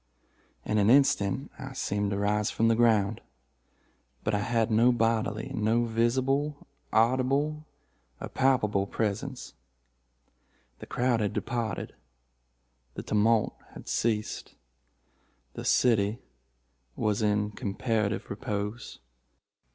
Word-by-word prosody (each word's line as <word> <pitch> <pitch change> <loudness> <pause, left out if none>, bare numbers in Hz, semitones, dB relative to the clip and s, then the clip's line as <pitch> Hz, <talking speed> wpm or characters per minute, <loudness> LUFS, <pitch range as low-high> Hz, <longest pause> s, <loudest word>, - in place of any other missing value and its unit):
In 110 0 +1
an 100 +1 +3
instant 135 -2 +3
I 135 0 -7
seemed 105 -5 -1
to 100 - -2
rise 105 +1 +1
from 115 0 +1
the 115 - +4
ground. 110 -3 +2 1.0
But 105 - -1
I 105 - +2
had 115 +2 0
no 115 +3 +5
bodily, 110 -2 0
no 110 +2 +1
visible, 130 +6 0 0.3
audible, 135 +6 +1 0.5
or - - -5
palpable 105 -7 +1
presence. 115 +6 -3 1.3
The - - -10
crowd 125 -2 +1
had 105 -2 -1
departed. 120 -2 -3 1.0
The - - -5
tumult 110 +1 +2 0.2
had - - -11
ceased. 110 -2 -2 1.0
The - - -7
city 110 -3 +3 0.8
was 105 -1 0
in 105 0 +1
comparative 105 0 -2
repose. 105 +1 -4
115 Hz, 105 wpm, -28 LUFS, 105-125 Hz, 1.3 s, no